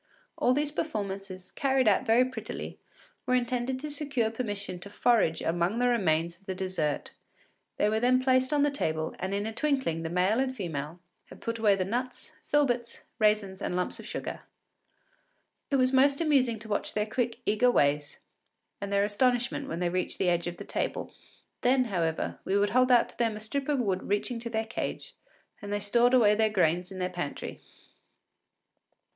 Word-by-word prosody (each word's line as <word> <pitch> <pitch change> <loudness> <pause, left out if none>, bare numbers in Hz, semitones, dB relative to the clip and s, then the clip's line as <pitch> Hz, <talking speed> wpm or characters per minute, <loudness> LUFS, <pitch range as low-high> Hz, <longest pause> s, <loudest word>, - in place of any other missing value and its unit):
All 250 - +2
these 295 +1 0
performances, 195 - -4
carried 265 -3 +1
out 205 +1 +3
very 235 +3 +5
prettily, 240 -4 -6 0.5
were 255 - +3
intended 250 +1 -1
to 300 0 -5
secure 275 -6 -1
permission 205 -6 -4
to 200 - -8
forage 205 -6 +2
among 175 +6 0
the 245 +1 +2
remains 170 -6 +1
of 195 - -29
the 190 - -3
dessert. 185 -6 -2 0.7
They - - +3
were 215 +1 +1
then 250 +2 +4
placed 255 0 +2
on 290 -1 +3
the 290 - +2
table, 160 - -2
and 190 +1 -3
in 200 +1 -1
a 220 - -3
twinkling 265 - 0
the 165 - -3
male 185 +6 +2
and 260 -1 0
female 165 - -5 0.3
had - - -14
put 230 0 -4
away 210 -3 +4
the 185 -1 -1
nuts, 245 +5 -3 0.2
filberts, 245 -5 +1 0.2
raisins, 210 -3 +2
and - - -2
lumps 180 0 -1
of - - -9
sugar. - - -5 1.3
It 280 - +1
was 255 0 +3
most 275 +1 +5
amusing 270 -8 +2
to 215 +1 -11
watch 205 - -2
their 210 0 +1
quick, 235 +1 -2
eager 215 +4 +3
ways, 145 -7 +1 0.6
and 200 0 -4
their 200 0 +3
astonishment 245 +6 +1
when 170 - -4
they 175 0 0
reached 185 +1 -1
the 185 - +2
edge 175 0 0
of 175 0 -5
the - - -8
table. - - -3 0.5
Then, 255 +1 +4
however, 170 -8 -2
we 195 - +1
would 205 0 +2
hold 255 +1 +4
out 240 -1 +5
to - - -16
them 230 -2 +1
a - - -6
strip 270 +6 -3
of 290 - +2
wood 195 -7 0
reaching 205 +4 -1
to 235 0 -5
their 220 -1 -1
cage, 240 - -5 0.5
and 205 - -6
they 205 - 0
stored 235 +5 +3
away 215 -4 +6
their 220 +1 +2
gains 180 -2 +1
in 190 - -7
their 180 -1 -1
pantry. 175 -5 -5
220 Hz, 190 wpm, -29 LUFS, 185-255 Hz, 1.3 s, away